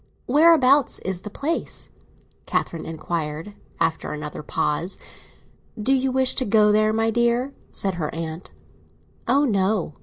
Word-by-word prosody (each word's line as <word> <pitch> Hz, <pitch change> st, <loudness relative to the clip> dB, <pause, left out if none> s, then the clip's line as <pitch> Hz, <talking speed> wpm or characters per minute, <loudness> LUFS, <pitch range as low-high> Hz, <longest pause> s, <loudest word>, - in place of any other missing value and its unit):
"Whereabouts 285 Hz, -2 st, +5 dB
is 190 Hz, -2 st, -2 dB
the 210 Hz, -, -7 dB
place?" 290 Hz, +10 st, -3 dB, 0.6 s
Catherine 165 Hz, -, -2 dB
inquired, 160 Hz, +2 st, -4 dB, 0.3 s
after 165 Hz, 0 st, 0 dB
another 150 Hz, 0 st, -6 dB
pause. 150 Hz, +4 st, -2 dB, 0.8 s
"Do 255 Hz, +6 st, +2 dB
you 265 Hz, 0 st, +1 dB
wish 260 Hz, 0 st, +2 dB
to -, -, +2 dB
go 210 Hz, 0 st, +4 dB
there, 215 Hz, +1 st, +3 dB
my 225 Hz, +1 st, +1 dB
dear?" 240 Hz, +3 st, +1 dB, 0.2 s
said 195 Hz, -1 st, -1 dB
her 150 Hz, -, -1 dB
aunt. 165 Hz, +1 st, -6 dB, 0.8 s
"Oh 275 Hz, +4 st, +4 dB
no!" 195 Hz, -, 0 dB
210 Hz, 130 wpm, -23 LUFS, 165-255 Hz, 0.8 s, Whereabouts